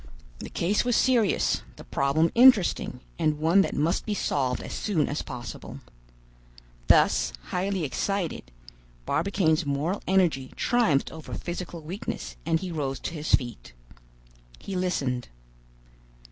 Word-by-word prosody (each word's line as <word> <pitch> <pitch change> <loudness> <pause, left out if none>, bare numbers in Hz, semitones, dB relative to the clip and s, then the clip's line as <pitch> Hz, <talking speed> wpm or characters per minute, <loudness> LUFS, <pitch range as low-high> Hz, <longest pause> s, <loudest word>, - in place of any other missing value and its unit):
The - - -7
case 195 +5 +1
was 245 -1 +1
serious, 235 -6 +2
the - - -11
problem 140 - +1
interesting, 225 - +5 0.2
and 155 -2 +1
one 165 +6 +4
that - - -1
must 155 +4 +1
be 210 - -2
solved 130 -8 0
as - - -7
soon 170 -9 0
as 145 - -2
possible. 120 -2 -8 1.1
Thus, - - +4 0.2
highly 190 0 -1
excited, 180 - -2 0.6
Barbicane's 165 - +1
moral 145 +7 -1
energy 170 -9 +2
triumphed 230 - +2
over 160 -1 -8
physical 175 -1 -5
weakness, 180 +7 -5
and 165 -1 +2
he 185 -2 -4
rose 140 -4 -2
to - - -4
his 155 -1 +3
feet. 120 - -8 0.8
He 195 - -6
listened. 140 -9 -1
165 Hz, 130 wpm, -26 LUFS, 145-195 Hz, 1.1 s, interesting